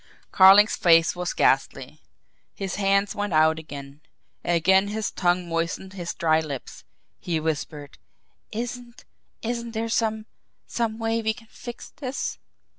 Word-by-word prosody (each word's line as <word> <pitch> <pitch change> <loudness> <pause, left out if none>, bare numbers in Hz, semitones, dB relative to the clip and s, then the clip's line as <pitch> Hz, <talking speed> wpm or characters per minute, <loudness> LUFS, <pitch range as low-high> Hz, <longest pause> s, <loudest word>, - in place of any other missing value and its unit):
Carling's 195 +2 +7
face 165 -1 +4
was 180 -1 -2
ghastly. 135 +2 0 0.5
His 195 -2 -4
hands 195 0 +2
went 205 -3 -3
out 160 +1 +4
again 140 -2 -10 0.4
again 190 +3 +3
his 215 +1 -3
tongue 175 0 0
moistened 170 +3 -3
his 175 -3 -5
dry 160 -1 +2
lips. 145 -5 -7 0.4
He 170 -3 -2
whispered: 150 -2 -4 0.5
"Isn't 240 +1 -6 0.4
isn't 235 0 -3
there 225 +1 -2
some 220 -1 0 0.4
some 225 -2 -2
way 225 0 -1
we 220 0 0
can 225 -2 -16
fix 240 -1 -9
this?" 270 0 -5
190 Hz, 130 wpm, -25 LUFS, 160-220 Hz, 0.5 s, Carling's